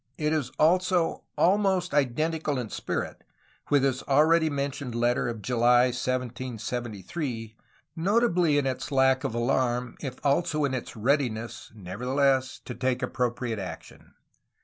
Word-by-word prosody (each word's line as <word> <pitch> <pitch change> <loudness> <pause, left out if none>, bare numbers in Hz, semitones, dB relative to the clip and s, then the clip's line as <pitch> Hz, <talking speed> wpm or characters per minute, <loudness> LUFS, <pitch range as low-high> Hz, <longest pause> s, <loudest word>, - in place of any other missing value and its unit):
It 150 -1 0
is 145 -5 -1
also 180 +1 +2
almost 190 -2 +2
identical 150 +2 0
in 120 -4 -4
spirit - - -4 0.5
with 145 -2 +4
his 135 -1 +1
already 160 +3 +4
mentioned 140 -3 -3
letter 120 +1 +1
of 115 -3 -5
July 125 +1 +4
1773,^ 120 - -4 0.4
notably 180 -4 +2
in 145 - +1
its 130 +1 -3
lack 130 -1 +3
of 115 - -2
alarm, 120 0 0
if 135 -4 -5
also 150 +1 +2
in 135 - -1
its 130 - -5
readiness, 120 -1 -1
nevertheless, 130 +7 0
to 125 - -5
take 130 +1 -1
appropriate 120 -2 -2
action. 85 -4 -9
130 Hz, 125 wpm, -27 LUFS, 120-150 Hz, 0.5 s, with